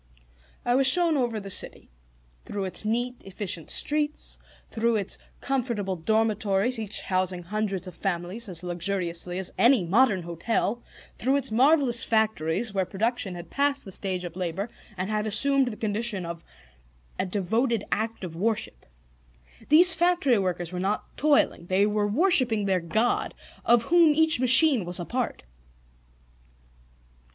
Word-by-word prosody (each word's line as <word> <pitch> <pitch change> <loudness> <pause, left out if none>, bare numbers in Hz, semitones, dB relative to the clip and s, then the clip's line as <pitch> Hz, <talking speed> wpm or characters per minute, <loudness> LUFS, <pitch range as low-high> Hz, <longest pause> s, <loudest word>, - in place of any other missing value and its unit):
I 245 - +2
was 265 +1 +3
shown 335 +3 +3
over 240 -5 -1
the 195 -1 -6
city, - - -1 0.5
through 200 -1 -4
its 190 +2 -1
neat, 240 +3 -2
efficient 190 -3 -5
streets, 300 0 -1 0.3
through 230 0 0
its 200 -2 -1 0.2
comfortable 235 -8 -2
dormitories 215 +4 0
each 220 -1 -2
housing 185 -1 -2
hundreds 195 0 -3
of 185 - -9
families 190 +5 -4
as 175 -1 -6
luxuriously 175 0 -2
as 190 -1 -4
any 240 -6 +4
modern 200 0 +2
hotel, 175 +8 -2 0.4
through 265 +4 +1
its 270 -4 -1
marvelous 260 0 +4
factories 220 -2 0
where 190 -1 +1
production 200 0 -2
had 175 0 -10
passed 280 0 0
the 195 - -9
stage 185 -1 -3
of 175 -1 -7
labor 185 +4 -4 0.3
and 190 +3 -3
had 215 0 -1
assumed 270 +5 +3
the 220 -3 -5
condition 210 -3 -2
of 170 0 -7 0.8
a - - 0
devoted 220 +4 -1
act 220 -1 -2
of 170 -3 -7
worship. 200 - -3 0.8
These 335 +4 +7
factory 340 - +2
workers 175 -3 -3
were 180 - -5
not 195 +3 -3
toiling: 290 - +1
they 190 +2 +2
were 210 0 0
worshipping 245 - +2
their 190 -2 +1
God, 220 +9 -1 0.3
of 235 -1 +3
Whom 335 0 +4
each 320 -3 +3
machine 255 - +7
was 175 +1 -2
a 175 - -4
part. 245 - -3
215 Hz, 145 wpm, -26 LUFS, 185-245 Hz, 0.8 s, These